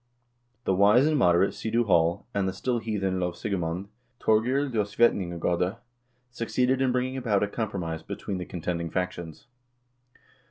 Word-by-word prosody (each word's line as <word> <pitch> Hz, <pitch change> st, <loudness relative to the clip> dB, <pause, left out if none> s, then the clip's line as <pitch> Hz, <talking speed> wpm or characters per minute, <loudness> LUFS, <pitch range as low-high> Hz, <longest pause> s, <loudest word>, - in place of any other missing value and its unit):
The 95 Hz, -, +1 dB
wise 105 Hz, +7 st, +5 dB
and 155 Hz, 0 st, +2 dB
moderate 90 Hz, -7 st, +3 dB
Sidu 115 Hz, +2 st, 0 dB
Hall, 85 Hz, -5 st, +2 dB
and 100 Hz, -1 st, 0 dB
the -, -, -4 dB
still 125 Hz, +2 st, -1 dB
heathen 100 Hz, -4 st, -1 dB
lovsigemand, 90 Hz, 0 st, -2 dB, 0.3 s
Thorgeir 125 Hz, +6 st, +2 dB
Ljosvetninga 105 Hz, -6 st, +1 dB
gode, 90 Hz, +4 st, 0 dB, 0.6 s
succeeded 125 Hz, +3 st, 0 dB
in 130 Hz, -1 st, +3 dB
bringing 130 Hz, +1 st, -1 dB
about 110 Hz, -6 st, +1 dB
a -, -, +1 dB
compromise 95 Hz, -7 st, -3 dB
between 95 Hz, +3 st, -5 dB
the 90 Hz, -, -4 dB
con 90 Hz, -, -7 dB
tending 85 Hz, 0 st, -2 dB
factions. 85 Hz, -2 st, -4 dB
100 Hz, 145 wpm, -27 LUFS, 90-120 Hz, 0.6 s, wise